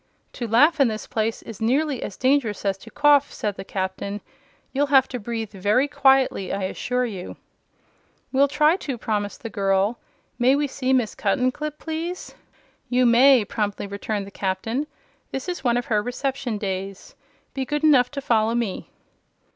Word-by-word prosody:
"To 240 - -4
laugh 295 +9 +4
in 275 - +5
this 215 -1 -4
place 220 0 -2
is 225 -3 -10
nearly 270 +4 +1
as 195 - -6
dangerous 255 -6 +1
as 195 -1 +1
to 225 - -13
cough," 290 +2 +4
said 205 -2 -3
the - - -7
Captain. 190 +1 -4 0.5
"You'll 285 +2 +1
have 270 -2 +5
to 250 - -4
breathe 225 -1 -4
very 210 +7 +1
quietly, 270 -8 +3
I 195 - -2
assure 250 +6 -1
you." 195 -6 -7 0.9
"We'll 275 +1 +4
try 300 +4 +3
to," 275 -9 -5
promised 210 -1 -3
the 230 - -5
girl. 195 +3 +1 0.4
"May 255 +3 +4
we 290 +1 +1
see 265 -1 -2
Miss 245 -5 +2
Cuttenclip, 255 +8 -1
please?" 330 +3 -5 0.6
"You 250 0 +3
may," 245 0 +6
promptly 205 -1 -3
returned 200 0 -4
the 200 - -11
Captain. 215 +10 -2 0.4
"This 270 - -5
is 355 -4 -4
one 240 -2 +2
of 245 - -2
her 210 -2 +1
reception 250 0 -3
days. 195 -1 -5 0.4
Be 270 - -2
good 295 +3 -3
enough 265 -5 +5
to 285 -1 -5
follow 225 -2 +2
me." 230 -5 -3
240 Hz, 170 wpm, -23 LUFS, 205-275 Hz, 0.9 s, may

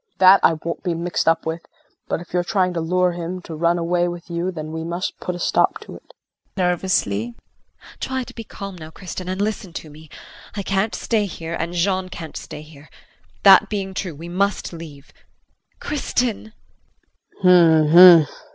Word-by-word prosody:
That 190 +1 +7
I - - +4
won't 165 +1 -5
be 175 -3 -2
mixed 170 0 -2
up 165 0 +2
with, 160 +1 -3 0.5
but - - -2
if 175 - -13
you're 180 -1 +1
trying 180 0 0
to 170 - -2
lure 180 +2 +1
him 175 +1 -5
to 165 - -8
run 170 +2 +1
away 175 +1 0
with 175 0 -7
you 170 +2 -2
then 155 -3 -7
we 160 0 -5
must 170 +2 -4
put 180 - -4
a - - -7
stop - - +1
to - - -11
it. - - -16 0.4
JULIE. 170 - 0 0.6
Try 260 0 -3
to - - -12
be 230 - -8
calm 200 -3 -9
now 155 -1 -10
Kristin, 185 +1 -8
and 185 +1 -3
listen 205 -3 -3
to 155 - -8
me. 155 +1 -15 0.5
I 200 - -3
can't 195 +3 -1
stay 215 -3 0
here 165 -2 -7
and 170 +1 -3
Jean 185 +1 0
can't 165 -3 -9
stay 150 - -8
here. 150 -1 -16 0.5
That 195 -2 +7
being 195 -2 -3
true, 185 -4 -4
we 165 +4 -9
must 195 +2 -1
leave 155 -4 -11 0.7
Kristin. 245 -6 -2 0.9
KRISTIN. 170 -1 +7
175 Hz, 180 wpm, -21 LUFS, 165-190 Hz, 0.9 s, That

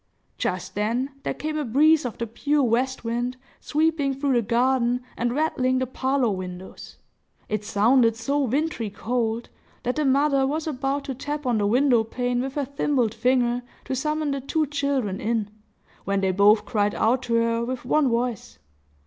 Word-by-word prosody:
Just 185 +1 -2
then, 235 +7 -1
there - - -2
came 310 0 -3
a - - -1
breeze 300 +5 +4
of 240 - -4
the 235 - -2
pure 285 +6 0
west 255 +2 0
wind, 240 +2 -2 0.2
sweeping 305 -3 0
through 275 0 0
the 240 - +3
garden 245 +2 +1
and 240 +1 -1
rattling 260 -4 +1
the 260 - 0
parlor 260 -1 0
windows. 185 -1 -7 0.5
It 215 -1 -1
sounded 230 +3 +3
so 275 +6 -1
wintry 275 -3 -1
cold, 230 +2 -2 0.3
that 250 +4 -1
the 305 - +1
mother 275 0 +3
was 310 +3 -2
about 275 -1 -2
to 270 - -4
tap 290 +3 -5
on 240 -3 +1
the 205 - +1
window 245 +1 +3
pane 245 +2 -1
with 265 +1 -4
her 290 -2 0
thimbled 270 -4 0
finger, 245 +1 +1 0.2
to 265 - -2
summon 300 +2 -1
the 275 -1 -2
two 310 +4 0
children 280 -8 -1
in, 215 -2 -1 0.5
when 195 0 0
they 190 -1 +2
both 205 +3 +4
cried 205 -2 0
out 245 +4 +2
to 230 - +2
her 230 0 +1
with 250 +1 -4
one 280 +1 +3
voice. 235 -1 -2
250 Hz, 175 wpm, -24 LUFS, 230-280 Hz, 0.5 s, breeze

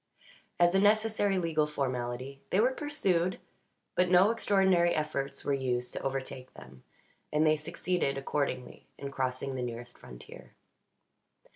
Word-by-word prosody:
As 175 0 +5
a 195 - +4
necessary 210 -1 +3
legal 160 -4 +1
formality, 130 -1 -3
they 190 - +2
were 245 +4 +4
pursued, 190 - 0 0.6
but 180 0 +2
no 185 +4 +6
extraordinary 190 -6 +3
efforts 140 -3 -3
were 140 - +1
used 125 -2 -1
to - - -4
overtake 135 -1 -4
them; 65 0 -14 0.5
and 150 +1 +3
they 155 0 +5
succeeded, 165 -1 -1
accordingly, 135 -2 -3
in 140 0 -6
crossing 130 0 -2
the 130 - -3
nearest 120 0 -6
frontier. - - -12
150 Hz, 135 wpm, -30 LUFS, 130-185 Hz, 0.6 s, no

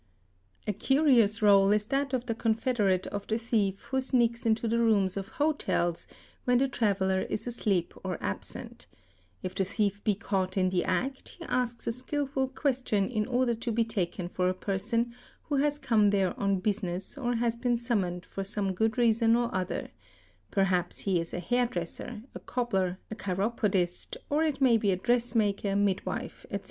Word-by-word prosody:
A 210 - 0
curious 235 -2 +3
réle 200 -1 +6
is 210 0 0
that 275 +3 0
of 255 -2 -1
the 235 - -1
confederate 220 -4 +1
of 205 0 -5
the 220 - +1
thief 215 -4 0
who 265 0 +2
sneaks 235 -3 +1
into 225 +1 +2
the 230 +1 +1
rooms 205 -5 +3
of 195 -1 -4
hotels 285 - 0 0.4
when 245 0 +4
the 270 +2 +3
traveller 195 -6 +1
is - - -3
asleep 205 -7 0
or 185 -2 -2
absent; 100 - -6 0.6
if 185 - -3
the 195 - 0
thief 205 +1 -1
be 210 - +2
caught 190 -2 -2
in 185 -1 +3
the 180 -1 +1
act, 265 +1 -1
he - - -9
asks 245 -1 -1
a - - +1
skilful 265 +2 -2
question 255 -7 0
in 215 -3 0
order 250 -1 +2
to 230 +1 -3
be 230 +1 +2
taken 185 -5 -2
for 180 0 0
a 185 - -1
person 215 +5 -1 0.3
who 290 - -1
has 290 +1 +2
come 225 -7 +3
there 195 -2 +2
on 195 -2 +1
business 190 -2 -2
or 245 -4 -1
has 230 0 +1
been 240 0 +1
suminoned 195 -7 -1
for 195 - -5
some 195 -1 -1
good 220 +5 0
reason 230 -1 +4
or 240 0 0
other; 185 0 -2 0.6
perhaps 190 -3 +1
he 190 -3 +1
is 165 - -4
a - - -3
hairdresser, 220 +1 -2
a - - -7
cobbler, 195 -7 -1
a - - -3
chiropodist, 195 -3 -1
or 295 +2 +3
it 300 -3 0
may 255 -4 +5
be 210 -2 +1
a 190 - +3
dress 240 +4 0
maker, 200 -2 +1
midwife, 200 -2 -1
etc. - - -2
220 Hz, 180 wpm, -29 LUFS, 195-245 Hz, 0.6 s, réle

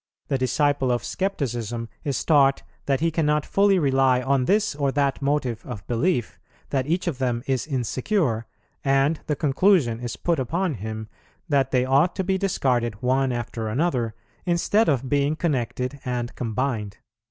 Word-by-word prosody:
The 135 - +1
disciple 135 +1 +1
of 120 - 0
Scepticism 120 - -2 0.2
is 140 -4 -2
taught 140 -3 +4 0.2
that 135 0 +1
he 165 0 +2
cannot 150 -2 +1
fully 200 -1 +3
rely 135 -5 +3
on 130 0 +1
this 210 +3 +2
or 140 -1 0
that 140 -1 0
motive 135 -5 -1
of 110 -7 -8
belief, 120 +1 0 0.3
that 135 -1 0
each 170 +4 0
of 160 -7 -2
them 120 -2 -1
is 135 0 -1
insecure, 130 - -1 0.4
and 135 +3 +2
the 150 - 0
conclusion 145 - +2
is 120 -1 -4
put 170 -3 0
upon 165 +7 -1
him 110 0 -6 0.4
that 140 -4 +2
they 125 -1 +2
ought 140 +7 +3
to 190 - -1
be 190 +1 0
discarded 125 - 0
one 130 +1 +2
after 120 -2 -4
another, 120 -3 0 0.3
instead 180 +5 +2
of 135 -3 0
being 145 +2 +1
connected 135 -4 -2
and 120 -1 -3
combined." 110 -3 -2
135 Hz, 160 wpm, -24 LUFS, 120-155 Hz, 0.4 s, taught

